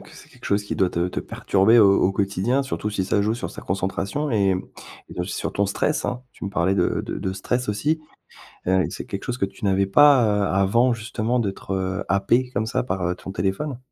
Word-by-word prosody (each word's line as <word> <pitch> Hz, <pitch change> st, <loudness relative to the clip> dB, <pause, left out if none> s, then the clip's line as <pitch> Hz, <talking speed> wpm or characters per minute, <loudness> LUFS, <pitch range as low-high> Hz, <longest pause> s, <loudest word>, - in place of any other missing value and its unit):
que -, -, -15 dB
c'est -, -, -15 dB
quelque -, -, -18 dB
chose 100 Hz, 0 st, 0 dB
qui -, -, -4 dB
doit 95 Hz, -2 st, +2 dB
te 85 Hz, +1 st, 0 dB
te 90 Hz, -, -3 dB
perturber 105 Hz, +5 st, +3 dB
au 100 Hz, -2 st, +6 dB
au 95 Hz, -, +3 dB
quotidien, 100 Hz, +7 st, 0 dB
surtout 105 Hz, -5 st, -3 dB
si 95 Hz, -3 st, -1 dB
ça 100 Hz, +1 st, +1 dB
joue 110 Hz, -, +1 dB
sur 120 Hz, +2 st, -4 dB
sa -, -, -10 dB
concentration 95 Hz, +9 st, -2 dB
et, 100 Hz, -3 st, +3 dB
hem, 90 Hz, 0 st, -2 dB, 0.4 s
et -, -, -6 dB
aussi 90 Hz, +3 st, -3 dB
sur -, -, -3 dB
ton 100 Hz, 0 st, +1 dB
stress, 150 Hz, +9 st, -1 dB
hein, 125 Hz, 0 st, -2 dB
tu -, -, -10 dB
me 100 Hz, -, -3 dB
parlais 95 Hz, -1 st, +1 dB
de 90 Hz, -, +1 dB
de -, -, -4 dB
de 95 Hz, -, -2 dB
stress 125 Hz, +5 st, -2 dB
aussi, 145 Hz, +10 st, 0 dB, 0.7 s
heu, 95 Hz, 0 st, +3 dB
c'est -, -, -7 dB
quelque 100 Hz, -, -5 dB
chose 125 Hz, 0 st, -3 dB
que 95 Hz, -, +1 dB
tu 95 Hz, +2 st, -11 dB
n'avais 95 Hz, 0 st, +2 dB
pas, 140 Hz, +4 st, +6 dB
heu, 105 Hz, -1 st, +1 dB
avant, 115 Hz, +6 st, +3 dB
justement 115 Hz, +1 st, -2 dB
d'être, 95 Hz, -2 st, -4 dB
heu, 95 Hz, 0 st, -2 dB
happé 115 Hz, +6 st, +2 dB
comme 110 Hz, -2 st, -1 dB
ça -, -, 0 dB
par, 95 Hz, -6 st, -3 dB
heu, 90 Hz, -, 0 dB
ton 95 Hz, +1 st, -8 dB
téléphone? 100 Hz, -, -2 dB
100 Hz, 235 wpm, -23 LUFS, 95-120 Hz, 0.7 s, au